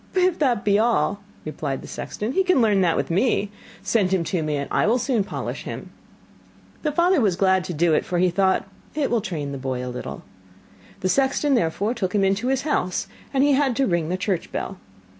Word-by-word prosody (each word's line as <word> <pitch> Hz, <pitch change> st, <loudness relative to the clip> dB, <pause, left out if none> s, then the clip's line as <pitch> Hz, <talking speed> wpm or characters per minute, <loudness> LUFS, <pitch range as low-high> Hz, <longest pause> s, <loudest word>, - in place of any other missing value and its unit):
'If 365 Hz, -2 st, +2 dB
that 250 Hz, -8 st, +1 dB
be 205 Hz, 0 st, +4 dB
all,' 220 Hz, -3 st, +1 dB, 0.2 s
replied 145 Hz, -3 st, -4 dB
the -, -, -9 dB
sexton, 215 Hz, +3 st, -4 dB
'he 380 Hz, +8 st, +2 dB
can 365 Hz, -6 st, +3 dB
learn 210 Hz, -4 st, +3 dB
that 170 Hz, -3 st, +2 dB
with -, -, -1 dB
me. 200 Hz, +2 st, +1 dB, 0.3 s
Send 200 Hz, -5 st, +1 dB
him 190 Hz, -3 st, +2 dB
to 170 Hz, +1 st, -1 dB
me, 155 Hz, -1 st, -1 dB
and 140 Hz, -1 st, -2 dB
I -, -, +2 dB
will 230 Hz, +3 st, +3 dB
soon 245 Hz, -4 st, +1 dB
polish -, -, -5 dB
him.' -, -, -7 dB, 0.9 s
The 305 Hz, -, 0 dB
father 340 Hz, +1 st, +3 dB
was 200 Hz, -6 st, +2 dB
glad 190 Hz, 0 st, +3 dB
to 180 Hz, -, -4 dB
do 165 Hz, +1 st, +3 dB
it, -, -, +2 dB
for 180 Hz, -, -2 dB
he 180 Hz, 0 st, +3 dB
thought: 190 Hz, +1 st, +2 dB, 0.3 s
'It 295 Hz, -3 st, 0 dB
will 235 Hz, -2 st, +2 dB
train 150 Hz, -7 st, -4 dB
the 140 Hz, -, -5 dB
boy 130 Hz, -1 st, -3 dB
a 125 Hz, -, -5 dB
little.' 125 Hz, -, -6 dB, 0.8 s
The 185 Hz, -, 0 dB
sexton 275 Hz, +4 st, +2 dB
therefore 205 Hz, +1 st, +1 dB
took 195 Hz, -5 st, -2 dB
him 200 Hz, -, +3 dB
into 195 Hz, +5 st, +1 dB
his 265 Hz, 0 st, +1 dB
house, 230 Hz, -, 0 dB, 0.3 s
and 270 Hz, -1 st, +2 dB
he 290 Hz, -, +4 dB
had 270 Hz, -2 st, +2 dB
to 270 Hz, -, +2 dB
ring 170 Hz, -7 st, 0 dB
the 185 Hz, -, -1 dB
church 185 Hz, -2 st, -2 dB
bell. 190 Hz, -1 st, -4 dB
200 Hz, 220 wpm, -23 LUFS, 175-260 Hz, 0.9 s, be